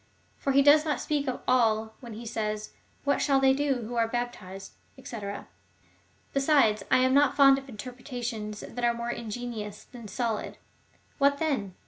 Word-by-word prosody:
For 275 - 0
he 275 +1 +5
does 295 +2 +7
not 300 -5 -1
speak 295 -2 -1
of 255 - -3
all 220 -3 +2
when 235 -3 -9
he 230 +3 -8
says. 215 -1 -3 0.3
What 280 0 +1
shall 275 -2 +3
they 265 0 +5
do, 270 -3 0
who 225 +3 -6
are 230 -1 +3
baptized? 220 -5 -5 0.3
&c. 235 - -7 1.2
Besides, 275 -7 +3
I - - +5
am 260 0 +3
not 285 -1 +4
fond 275 -1 +6
of 270 0 -14
interpretations, 240 -2 -6
that 245 +1 -7
are 235 0 +3
more 235 0 -3
ingenious 225 -3 -6
than 240 -3 -11
solid. 220 +1 -3 0.6
What 280 0 +4
then? 265 - -1
245 Hz, 165 wpm, -28 LUFS, 220-275 Hz, 1.2 s, does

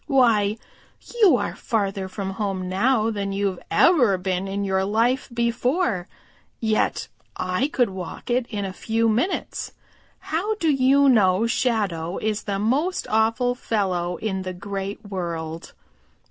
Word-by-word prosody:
"Why, 230 -7 +3 0.6
you 405 -5 +7
are - - -3
farther 195 -4 -2
from 190 0 -4
home 195 -2 -3
now 220 +4 +2
than 200 -2 -3
you've 195 -2 -1
ever 245 - +4
been 185 +1 -2
in 200 +1 -2
your 190 -1 +1
life 230 +7 +1
before, 235 - 0 0.5
yet 220 -1 0 0.3
I 185 +8 0
could 245 -7 +1
walk 185 -1 -7
to 240 - -1
it 250 -2 -2
in 205 -3 -3
a 190 - -5
few 225 +4 0
minutes. 240 - -1 0.4
How 390 +7 -2
do 330 -7 +1
you 275 +1 +4
know 210 -4 +4
Shadow 205 -9 0
is 215 -1 -2
the 200 -1 -1
most 275 - 0
awful 225 +3 +2
fellow 185 -7 -1
in 190 -2 -2
the 185 0 -5
Great 200 +3 -5
World?" 170 -4 -5
210 Hz, 145 wpm, -23 LUFS, 190-245 Hz, 0.6 s, you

